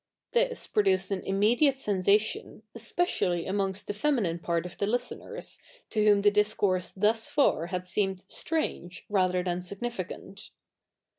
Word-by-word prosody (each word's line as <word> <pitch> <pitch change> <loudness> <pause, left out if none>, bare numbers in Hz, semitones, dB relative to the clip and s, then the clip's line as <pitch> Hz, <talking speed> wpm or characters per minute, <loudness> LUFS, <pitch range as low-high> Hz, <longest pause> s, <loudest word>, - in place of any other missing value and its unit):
This - - +1
produced 190 -2 +1
an 195 - -1
immediate 235 +8 +3
sensation, 210 -1 +1
especially 215 - 0
amongst 195 0 -1
the - - -3
feminine 205 - 0
part 170 0 -1
of 180 - -7
the 200 - 0
listeners, 245 +3 -3 0.3
to 215 -2 +1
whom 205 -1 +4
the 205 - +6
discourse 205 -3 +2
thus 215 +3 +1
far 170 - +2
had 180 0 -4
seemed 190 0 -1
strange, 190 - -3
rather 185 -3 +2
than 180 0 -2
significant. 195 0 -6
200 Hz, 135 wpm, -28 LUFS, 185-220 Hz, 0.3 s, the